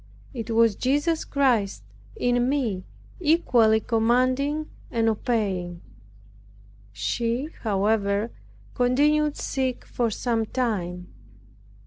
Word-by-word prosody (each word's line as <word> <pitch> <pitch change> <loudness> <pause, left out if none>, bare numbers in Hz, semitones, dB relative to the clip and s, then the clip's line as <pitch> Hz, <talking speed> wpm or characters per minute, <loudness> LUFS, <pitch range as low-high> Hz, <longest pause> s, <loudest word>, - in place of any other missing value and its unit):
It 230 -4 -6
was 230 -1 +4
Jesus 290 +5 +1
Christ 235 - +1 0.3
in 245 0 +1
me 230 -10 -1 0.3
equally 250 -10 +4
commanding 255 +7 +1 0.2
and 225 -1 0
obeying. 195 -6 -1 1.1
She, 235 - -2
however, 205 +1 +1 0.4
continued 295 +4 +2
sick 260 -2 -2
for 235 -2 -1
sometime. 220 -6 -2
235 Hz, 80 wpm, -25 LUFS, 215-260 Hz, 1.1 s, was